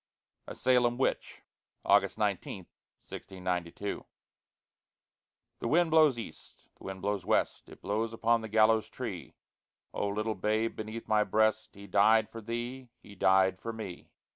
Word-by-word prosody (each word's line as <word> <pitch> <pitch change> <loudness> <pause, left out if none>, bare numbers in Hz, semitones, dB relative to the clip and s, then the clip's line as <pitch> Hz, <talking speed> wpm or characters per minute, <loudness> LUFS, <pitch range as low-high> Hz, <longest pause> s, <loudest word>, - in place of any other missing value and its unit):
A - - -7
SALEM 125 -1 +2
WITCH 130 - -2 0.4
[August - - +3
19, - - -2 0.4
1692] 90 +1 -4 1.6
The - - -3
wind 165 +5 +3
blows 155 -5 +5
east, 115 - -10
the - - -13
wind 95 -1 -7
blows 100 -2 -1
west, - - 0
It - - -15
blows 110 +3 -1
upon 115 0 +1
the 110 - -7
gallows 110 0 +3
tree: - - -6 0.6
Oh, 105 - -1
little 105 +2 -1
babe 110 +3 -1
beneath 110 +1 -6
my 105 -1 +3
breast, 110 +2 +1
He 100 0 -11
died 105 +3 +4
for 115 - -8
thee! 120 +3 -5
he 105 - -13
died 95 -1 +3
for 115 - -4
me! 110 -6 -8
110 Hz, 140 wpm, -30 LUFS, 100-115 Hz, 1.6 s, blows